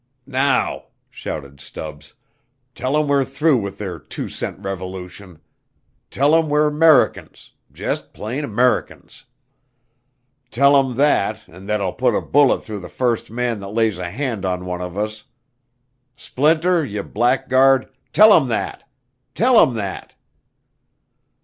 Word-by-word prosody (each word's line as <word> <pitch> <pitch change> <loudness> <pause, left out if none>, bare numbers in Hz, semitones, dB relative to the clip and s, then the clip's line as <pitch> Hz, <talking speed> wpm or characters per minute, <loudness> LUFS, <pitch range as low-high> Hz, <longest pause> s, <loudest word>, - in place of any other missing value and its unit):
"Now," 135 +1 0 0.3
shouted 70 -2 -7
Stubbs, 75 +1 -10 0.6
"tell 130 +4 -1
'em 150 -1 +1
we're 140 -1 +2
through 140 +2 +1
with 100 -3 -5
their 95 -5 -6
two - - -7
cent - - -5
revolution. 95 -1 -8 0.7
Tell 145 +3 +2
'em 165 -1 +3
we're 150 +1 +2
'Mericans 155 0 +2 0.2
jus' - - -3
plain 125 +8 -6
'Mericans. 125 +4 -1 1.2
Tell 140 +3 +4
'em 135 -3 +2
thet 140 -6 +1
and 90 +4 -14
thet 105 -1 -1
I'll 95 -2 -2
put - - +1
a - - 0
bullet 145 -1 +3
through 105 -2 -6
the 90 - -10
first 120 -3 -1
man 120 -1 -2
that 100 0 -8
lays 110 -5 +1
a 90 -1 -4
hand 115 -1 -3
on 90 -1 -2
one 90 -1 -4
of 90 +1 -6
us. 105 0 -4 0.9
Splinter, 160 +5 +1
ye 105 -6 -4
blackguard, 130 +3 +2 0.2
tell 215 0 +7
'em 135 - +4
that! 115 - -4 0.5
Tell 240 0 +5
'em 125 - +2
that!" 100 -3 -6
120 Hz, 135 wpm, -20 LUFS, 95-140 Hz, 1.2 s, tell